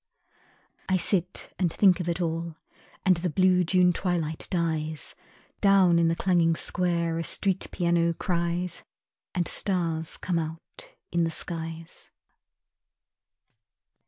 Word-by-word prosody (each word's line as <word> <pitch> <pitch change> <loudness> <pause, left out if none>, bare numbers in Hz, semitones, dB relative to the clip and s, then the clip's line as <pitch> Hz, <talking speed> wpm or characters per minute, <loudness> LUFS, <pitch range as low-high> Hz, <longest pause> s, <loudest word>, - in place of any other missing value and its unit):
I 190 - +3
sit 180 0 -1
and 180 -3 +1
think 190 -1 +4
of 175 -1 -2
it 170 - -2
all, 165 -1 -2 0.5
And 185 -2 +4
the 175 +1 -2
blue 185 +2 +3
June 180 +1 +3
twilight 165 -4 -2
dies, 160 -3 -2 0.5
Down 190 -4 +5
in 165 - +3
the 165 - +1
clanging 170 -2 +2
square 170 -1 0
A - - -2
street 190 +3 0
piano 170 -1 +1
cries 175 0 -2 0.5
And 175 -2 +1
stars 165 -4 -1
come 175 -2 -1
out 160 0 -8 0.2
in 170 0 +1
the 165 - +1
skies. 165 0 -7
170 Hz, 125 wpm, -27 LUFS, 165-180 Hz, 0.5 s, Down